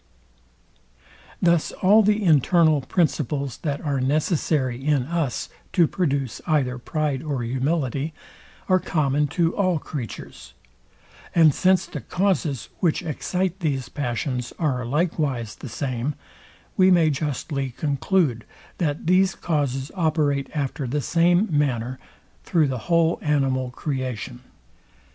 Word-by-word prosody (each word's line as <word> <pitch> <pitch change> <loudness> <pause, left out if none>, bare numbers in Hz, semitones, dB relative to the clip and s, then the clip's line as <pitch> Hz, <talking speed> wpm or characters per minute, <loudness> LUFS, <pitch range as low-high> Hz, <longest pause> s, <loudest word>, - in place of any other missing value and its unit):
Thus 170 -2 +3
all 205 +4 +5
the 210 0 +2
internal 155 -1 +4
principles, 140 - -1
that 145 -3 -3
are 140 -4 -1
necessary 140 -2 0
in 145 -3 +2
us 160 -2 -2 0.3
to 175 -3 +5
produce 140 - -1
either 130 -6 +1
pride 150 0 -2
or 145 -5 -3
humility, 135 +3 -1 0.6
are 185 -1 +4
common 150 -4 +1
to 170 -1 +2
all 185 -4 +2
creatures; 135 - -8 0.8
and 160 -4 +6
since 185 +1 +3
the 150 - -7
causes, 170 - -1
which 175 0 +1
excite 180 +4 -2
these 135 -7 -2
passions, 125 -2 -3
are 130 -7 -1
likewise 140 -6 -1
the 130 - -9
same, 130 +3 -3 0.6
we 185 0 +5
may 170 -4 +5
justly 140 -1 -2
conclude, 140 - 0 0.4
that 150 -3 -1
these 185 +2 +3
causes 140 -4 -1
operate 155 -5 0
after 140 -1 -2
the 145 +4 -1
same 175 - +3
manner 130 -3 0 0.4
through 160 -5 +2
the 130 -2 -2
whole 170 -1 +3
animal 135 -4 +1
creation. 130 - -4
150 Hz, 120 wpm, -23 LUFS, 130-170 Hz, 0.8 s, and